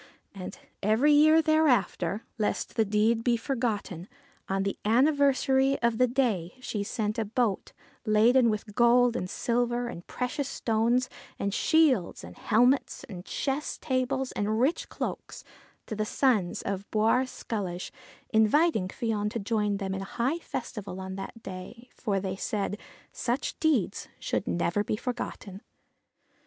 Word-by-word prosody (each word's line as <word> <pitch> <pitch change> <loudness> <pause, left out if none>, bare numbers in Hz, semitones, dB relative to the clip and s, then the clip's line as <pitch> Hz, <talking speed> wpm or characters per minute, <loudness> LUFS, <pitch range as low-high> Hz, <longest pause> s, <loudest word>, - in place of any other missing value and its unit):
And 190 -2 -7 0.2
every 220 +9 +3
year 310 +2 +6
thereafter 245 - +2
lest 210 - -1
the 225 - +3
deed 215 +3 +2
be 240 -1 +2
forgotten 225 - -3 0.4
on 195 0 0
the 195 - -3
anniversary 270 +2 +3
of 235 -1 +2
the 250 - +5
day 230 -9 0
she 220 -4 -3
sent 215 +1 -2
a 225 - 0
boat 220 -2 -1 0.3
laden 230 +3 +4
with 210 -1 -3
gold 240 +1 +4
and 180 - -3
silver 240 +2 0
and 175 -7 -8
precious 255 +2 -3
stones, 235 +2 +1 0.3
and 200 0 -2
shields 275 - +2
and 90 +1 -10
helmets 245 +5 +2
and 185 -5 -9
chess 280 +2 -2
tables 260 -1 -1
and 215 +2 -1
rich 275 +7 +1
cloaks; - - -5 0.4
and 215 -2 -5
the - - +2
sons 215 -5 +1
of 195 0 -4
Bawr 225 +4 +2
Sculloge 190 -8 -5 0.4
invited 220 - +3
Fion 215 -2 -1
to 230 - -4
join 210 -1 0
them 195 -1 -3
in 190 - -3
high 245 - -1
festival 210 - -6
on 190 0 -6
that 195 +4 -8
day, 215 +7 -9
for 200 -4 -1
they 190 -1 -3
said, 205 +1 -2 0.2
' - - -29
Such 245 +3 -2
deeds 275 - +1
should - - -2
never 175 +4 0
be 210 - -1
forgotten.' 210 -4 -5
225 Hz, 145 wpm, -28 LUFS, 200-255 Hz, 0.4 s, year